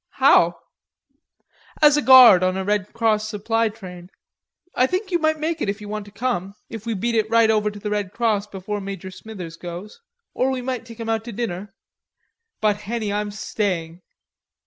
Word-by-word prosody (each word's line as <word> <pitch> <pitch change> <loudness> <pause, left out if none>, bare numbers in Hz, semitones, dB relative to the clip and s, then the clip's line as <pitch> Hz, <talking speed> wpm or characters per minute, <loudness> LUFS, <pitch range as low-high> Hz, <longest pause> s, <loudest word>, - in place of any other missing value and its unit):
"How?" - - +4 1.2
"As 295 -2 +6
guard 255 -9 +9
on 185 0 +1
a 190 - -2
Red 205 -1 -1
Cross 215 -2 0
supply 225 +2 0
train. 180 -5 -11 0.6
I 255 - +3
think 380 +5 -3
you 345 - +2
might 315 -1 +1
make 315 +1 -2
it - - 0
if 200 +1 -3
you 210 - -9
want 210 0 -5
to 205 - -14
come, 200 -3 -3 0.2
if 225 0 -8
we 225 - -1
beat 235 +5 -1
it 220 -1 +1
right 230 -1 +4
over 210 -1 +1
to 205 - -10
the 210 +1 -4
Red 205 -3 -2
Cross 215 -3 0
before 205 +1 -5
Major 195 -1 -7
Smithers 185 -5 -9
goes. 175 +5 -8 0.3
Or 255 - +1
we 260 -1 -3
might 250 -3 -4
take 230 -1 -12
him 230 - -5
out 225 -1 0
to 240 - -6
dinner." 200 -3 -5 0.9
"But, 210 -1 +2
Henny, 215 0 -3
I'm 210 0 -2
staying." 185 -5 -3
210 Hz, 190 wpm, -22 LUFS, 200-230 Hz, 1.2 s, guard